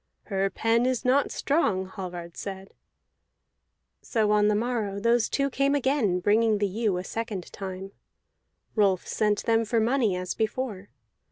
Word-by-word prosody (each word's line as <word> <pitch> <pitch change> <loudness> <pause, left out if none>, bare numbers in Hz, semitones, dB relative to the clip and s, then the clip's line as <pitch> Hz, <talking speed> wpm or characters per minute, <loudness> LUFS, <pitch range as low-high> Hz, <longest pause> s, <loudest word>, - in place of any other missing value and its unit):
"Her 195 -1 -1
pen 230 +4 +1
is 255 -2 -1
not 270 +3 +3
strong," 205 - +1
Hallvard 180 -3 -7
said. 195 -1 -7 1.3
So 215 -3 0
on 210 0 +4
the 210 - +3
morrow 215 -3 -1
those 235 +1 +2
two 275 0 0
came 275 +2 +2
again, 265 -9 +1
bringing 215 +2 +3
the 205 - +1
ewe 205 -1 0
a 180 - -3
second 215 -4 -5
time; 195 0 -6 0.8
Rolf 195 -4 +2
sent 210 -1 0
them 225 0 +3
for 230 +1 +1
money 225 -3 +2
as 180 0 -3
before. 220 -3 -3
210 Hz, 150 wpm, -26 LUFS, 195-235 Hz, 1.3 s, on